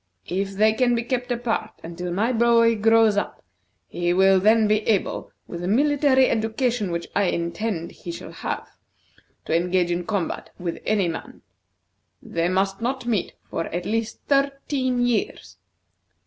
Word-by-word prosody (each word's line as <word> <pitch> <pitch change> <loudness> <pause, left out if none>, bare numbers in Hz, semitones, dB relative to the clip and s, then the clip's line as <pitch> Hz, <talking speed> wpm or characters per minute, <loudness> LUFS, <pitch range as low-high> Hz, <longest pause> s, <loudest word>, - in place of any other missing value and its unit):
If 195 +3 -2
they 215 +2 +4
can 245 +1 +2
be 235 - -1
kept 245 +1 -2
apart 235 -2 -2
until 175 +1 -5
my 215 +8 +1
boy 230 0 +4
grows 225 -1 +4
up, 205 - -3 0.4
he 175 0 -1
will 190 +1 +5
then 215 +2 +4
be 215 0 +3
able, 210 -4 0
with 170 - -7
the 175 - -3
military 270 +3 +3
education 225 -1 0
which 170 0 -3
I 200 - +3
intend 170 +1 -2
he 175 - -8
shall 170 - -8
have, - - -5 0.8
to - - 0
engage 175 +1 +1
in 175 0 -2
combat 200 -6 -2
with 175 -2 -4
any 205 -4 +2
man. 165 - -7 0.8
They 170 +1 -2
must 195 +2 0
not 255 +1 -2
meet 220 -7 -1 0.2
for 165 - -2
at 175 +1 -4
least 225 0 -2
thirteen 275 -3 +1
years. 230 - -2
215 Hz, 155 wpm, -23 LUFS, 180-235 Hz, 0.8 s, will